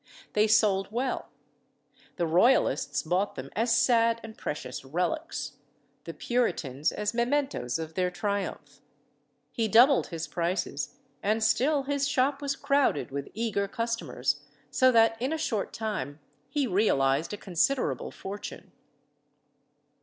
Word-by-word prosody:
They 210 +1 +4
sold 205 -3 +3
well; 250 +3 -2 0.9
the 170 - 0
Royalists 160 - +3
bought 180 +5 0
them 135 +1 -7
as 230 +1 +2
sad 230 -2 +3
and 220 -1 -9
precious 130 -4 -5
relics; 180 - -3 0.5
the - - -6
Puritans 155 - 0
as 210 +1 -2
mementos 240 - 0
of 160 0 -6
their 180 0 +1
triumph. 200 +2 -4 0.7
He 230 -3 0
doubled 245 +6 +6
his 165 -2 -5
prices, 170 - -2 0.3
and 215 +2 +1
still 275 +6 +2
his 280 0 0
shop 275 +1 +1
was 280 -1 -1
crowded 280 - +1
with 140 0 -4
eager 215 -3 -1
customers, 230 +1 -2 0.3
so 255 0 +5
that 225 -1 +4
in 260 +4 0
a 320 - 0
short 225 -9 -2
time 210 -9 -4 0.3
he 290 -2 0
realised 160 - +2
a 210 - -4
considerable 200 +9 0
fortune. 200 +1 -8
220 Hz, 130 wpm, -28 LUFS, 175-250 Hz, 0.9 s, doubled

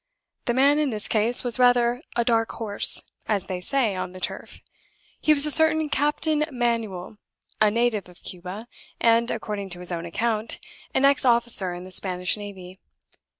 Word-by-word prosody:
The 240 - 0
man 280 +3 +4
in 300 -2 +1
this 215 -3 -3
case 225 +4 +2
was 245 0 +2
rather 245 0 +3
a 235 -1 +1
'dark 225 -1 +1
horse,' 215 -3 +1 0.2
as 205 -4 0
they 185 -2 -6
say 230 -1 0
on 185 0 -5
the 185 - -10
turf. - - -5 0.6
He 310 - +3
was 295 -1 +5
a 300 - +3
certain 315 0 +4
Captain 295 +2 0
Manuel, 225 -6 -3 0.4
a 215 - +5
native 220 -3 -1
of 175 - -18
Cuba, 185 +5 -8 0.3
and 230 +1 +3
(according 200 -2 -4
to 175 0 -2
his 180 0 -3
own 170 0 -4
account) 220 +4 -2 0.4
an 270 - +3
ex 280 0 +3
officer 235 -7 +4
in 175 - -8
the 185 - -11
Spanish 180 -1 -1
navy. 190 -3 -10
225 Hz, 175 wpm, -24 LUFS, 190-245 Hz, 0.6 s, was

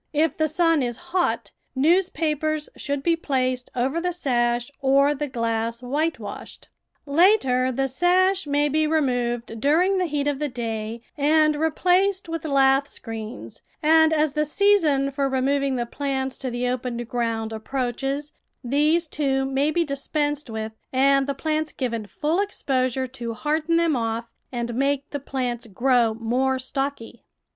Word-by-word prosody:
If 305 0 +2
the 315 - +1
sun 330 0 +2
is 240 -2 -2 0.2
hot, 365 -2 0 0.2
newspapers 310 -1 +1
should 285 -1 -3
be 335 +1 +3
placed 255 -5 -1
over 265 +7 0
the 360 +1 0
sash 240 -6 0
or 275 +1 +4
the 295 +1 -3
glass 230 -1 -2
whitewashed. 270 -5 -4 0.4
Later 280 -6 +3
the 270 +2 0
sash 360 +5 +2
may 290 +1 +2
be 310 +2 +1
removed 245 -6 -1
during 360 +8 +3
the 365 - +1
heat 290 -2 -1
of 285 -2 -1
the 300 -1 -1
day 225 -2 -4
and 305 +1 +3
replaced 360 +5 +1
with 330 -2 -4
lath 275 -1 +3
screens, 225 -1 -8 0.2
and 320 +1 +5
as 305 -2 +2
the 300 - +1
season 300 -5 +2
for 275 0 0
removing 270 +1 +1
the 240 -1 -1
plants 265 0 -3
to 260 - -3
the 245 +1 -2
open 250 -1 -2
ground 230 -2 -2
approaches, 270 +5 -3 0.3
these, 300 +7 +2
too, 270 -3 0
may 270 +2 +1
be 340 +2 +1
dispensed 290 0 -2
with 220 0 -4 0.2
and 275 +1 +3
the 280 - -2
plants 310 +2 -1
given 230 -5 -3
full 310 - -1
ex 405 0 -3
posure 260 -1 +1
to 235 -3 -5
harden 310 +5 0
them 335 -3 +3
off 230 0 -2 0.2
and 240 -1 -3
make 275 +3 0
the 285 - -3
plants 250 -4 -3
grow 235 +1 +2
more 250 +4 0
stocky. 260 -2 -4
275 Hz, 150 wpm, -24 LUFS, 245-310 Hz, 0.4 s, and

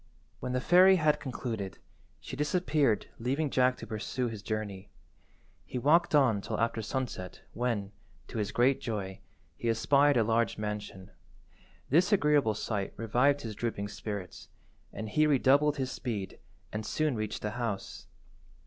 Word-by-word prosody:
When 125 - -4
the 125 - +1
fairy 185 +5 +7
had 155 -4 +2
concluded, 115 - -5 0.4
she - - -8
disappeared 150 - +1
leaving 135 +5 -1
Jack 130 0 +3
to - - -8
pursue 115 +3 -3
his 110 -3 -7
journey. 105 -3 -4 0.7
He - - -6
walked 155 +6 +3
on 120 -8 +4
till - - -4
after 115 0 0
sunset 110 -6 -4
when, 115 -4 -1 0.4
to 115 - -5
his 105 0 -1
great 130 +3 +3
joy, 100 -3 -4 0.4
he 120 - -1
espied 140 +4 +4
a 115 - +4
large 115 0 +1
mansion. 105 -3 -5 0.8
This 175 +8 +4
agreeable 150 - +3
sight 105 -2 -3
revived 125 +6 +2
his 110 -4 -5
drooping 100 -2 -3
spirits, 100 -2 -6 0.4
and 110 - -6
he 150 +8 +3
redoubled 145 +1 +4
his 130 -1 -2
speed, 105 -7 -4 0.3
and 110 0 -3
soon 155 +3 0
reached 110 -1 -4
the 105 - -1
house. 115 -4 -4
120 Hz, 150 wpm, -30 LUFS, 105-140 Hz, 0.8 s, fairy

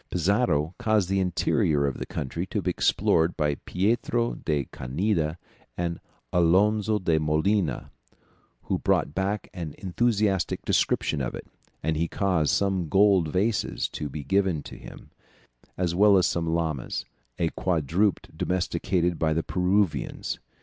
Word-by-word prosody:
Pizarro 90 -4 +1
caused 110 -6 +1
the 95 0 +1
interior 80 -5 +1
of 70 - -2
the - - -5
country 85 +7 -4
to - - -2
be - - 0
explored 80 +1 +2
by 75 -3 +1
Pietro 115 +4 0
de 75 -4 -2
Candia 80 - -1 0.4
and 85 -1 -2 0.3
Alonzo 105 +5 +3
de 85 -5 +1
Molina, 80 - 0 0.7
who - - -1
brought - - +1
back 100 +3 -2
an 85 -5 -6
enthusiastic 100 -1 0
description 75 - +1
of 60 - -3
it, - - -8 0.4
and 80 - 0
he 85 +2 0
caused 90 -5 0
some 95 -5 +1
gold 95 -3 +4
vases 100 +7 0
to 75 - -5
be 75 +1 -6
given 95 +3 +1
up 75 - -7
to - - -10
him, - - -12 0.7
as 90 -2 0
well 100 +2 +5
as 90 - +3
some 85 -2 -1
llamas, 80 -5 -2 0.3
a 85 - +1
quadruped 90 +4 0
domesticated 90 -1 0
by 80 -1 +2
the 80 +1 0
Peruvians. 95 0 0
90 Hz, 145 wpm, -26 LUFS, 80-100 Hz, 0.7 s, well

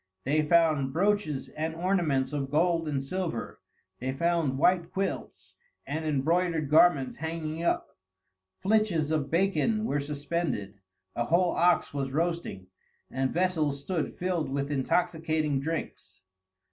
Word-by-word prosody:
They 150 +4 +2
found 155 -4 +3
brooches 185 -6 0
and 160 +1 -4
ornaments 165 -7 0
of 140 -2 -2
gold 165 +2 +2
and 140 -3 -1
silver, 165 -5 -4 0.4
they 130 +2 -2
found 160 -1 0
white 175 +3 +2
quilts 195 0 -4 0.3
and 155 +3 -3
embroidered 155 +1 +1
garments 155 -4 +4
hanging 160 0 -4
up, 170 - -1 0.6
flitches 195 -7 +1
of 150 -3 0
bacon 200 +5 +1
were 145 -8 0
suspended, 145 - -3 0.4
a 120 - 0
whole 175 +5 +3
ox 175 -3 +2
was 140 -2 -2
roasting, 165 - -2 0.5
and 130 0 -1
vessels 160 -6 0
stood 160 +2 -2
filled 175 -5 -2
with 140 +1 -2
intoxicating 155 0 0
drinks. 155 -9 -5
160 Hz, 125 wpm, -28 LUFS, 140-175 Hz, 0.6 s, garments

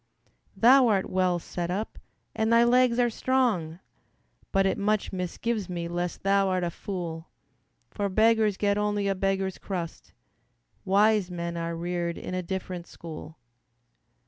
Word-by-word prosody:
"Thou 255 +2 +6
art 200 -4 +1
well 185 -1 +2
set 175 0 -5
up, 200 +5 -3 0.4
and 220 +1 +1
thy 230 0 +6
legs 245 0 +4
are 240 -1 +2
strong, 215 -11 0 0.7
But 195 -1 +3
it 190 - 0
much 210 +1 0
misgives 190 +3 -3
me 170 -1 -3
lest 175 0 -3
thou'rt 195 -2 +2
a 170 - -1
fool; 170 -3 -6 0.6
For 200 -2 -2
beggars 220 0 +3
get 205 0 +1
only 205 -1 0
a 195 - +2
beggar's 195 0 -1
crust, 175 -4 -6 0.7
Wise 205 0 +3
men 170 -1 -4
are 170 0 -3
reared 170 0 -2
in - - -6
a 185 - -1
different 180 -1 -5
school." 160 -1 -10
190 Hz, 145 wpm, -27 LUFS, 175-215 Hz, 0.7 s, Thou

